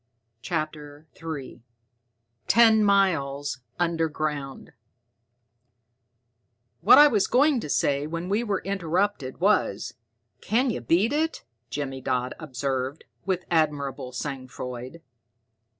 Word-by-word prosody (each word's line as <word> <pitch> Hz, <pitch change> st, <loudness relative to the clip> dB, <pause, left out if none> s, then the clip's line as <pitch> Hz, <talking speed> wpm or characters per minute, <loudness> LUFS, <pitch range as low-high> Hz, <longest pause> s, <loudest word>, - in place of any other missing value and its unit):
CHAPTER 155 Hz, -1 st, -5 dB
III 150 Hz, -7 st, -7 dB, 0.9 s
Ten 225 Hz, -2 st, +6 dB
Miles 145 Hz, -9 st, +1 dB, 0.2 s
Underground 155 Hz, -5 st, -2 dB, 2.1 s
"What -, -, +7 dB
I 295 Hz, -, +10 dB
was 210 Hz, -8 st, +2 dB
going 280 Hz, +1 st, +3 dB
to 150 Hz, -, -6 dB
say 140 Hz, +1 st, +1 dB
when 165 Hz, +2 st, -4 dB
we 205 Hz, +5 st, 0 dB
were 205 Hz, -4 st, -2 dB
interrupted, 185 Hz, -6 st, -1 dB
was, 205 Hz, +4 st, +1 dB, 0.5 s
'Can 245 Hz, +4 st, +1 dB
you 120 Hz, -, -4 dB
beat 180 Hz, -, +2 dB
it?'" 320 Hz, +2 st, -1 dB, 0.3 s
Jimmy 135 Hz, -2 st, -4 dB
Dodd 125 Hz, 0 st, -1 dB
observed, 135 Hz, -1 st, -3 dB, 0.2 s
with 185 Hz, -2 st, -1 dB
admirable 145 Hz, -5 st, 0 dB
sang 130 Hz, 0 st, -5 dB
froid. 125 Hz, +5 st, -8 dB
155 Hz, 105 wpm, -25 LUFS, 135-195 Hz, 2.1 s, I